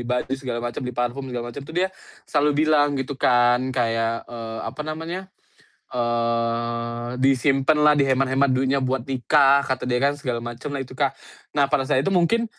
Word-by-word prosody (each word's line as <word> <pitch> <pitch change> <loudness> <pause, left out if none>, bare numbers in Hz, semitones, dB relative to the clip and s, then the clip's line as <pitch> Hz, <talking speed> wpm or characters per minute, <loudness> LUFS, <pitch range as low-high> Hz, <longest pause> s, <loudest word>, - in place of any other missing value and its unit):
baju 125 +2 -2
segala 125 -3 -3
macem, 120 +3 -4
beli 125 -1 -5
parfum 125 +2 -2
segala 120 -1 -5
macem 140 - -7
tuh 160 +5 -10
dia 190 +1 +1 0.3
selalu 145 -1 +1
bilang 145 -2 +3
gitu 135 0 -4
kan 125 +1 +3
kayak, 115 -2 -1
eee, 115 -1 -6
apa 115 +7 -6
namanya, 165 +5 -5 0.6
eee, 120 0 -1
"Disimpenlah, 135 +3 +4
dihemat-hemat 135 -1 +2
duitnya 130 +1 +1
buat 130 -1 -2
nikah," 140 +1 +4
kata 130 -2 -2
dia 125 +1 0
kan 145 +1 +1
segala 120 -4 -3
macemlah 135 +4 -5
itu 125 - -16
Kak. - - -1 0.4
Nah 140 -1 +4
pada 135 -3 +1
saat 130 - +2
itu 195 - +1
mungkin 185 +6 +3
130 Hz, 165 wpm, -23 LUFS, 120-145 Hz, 0.6 s, Disimpenlah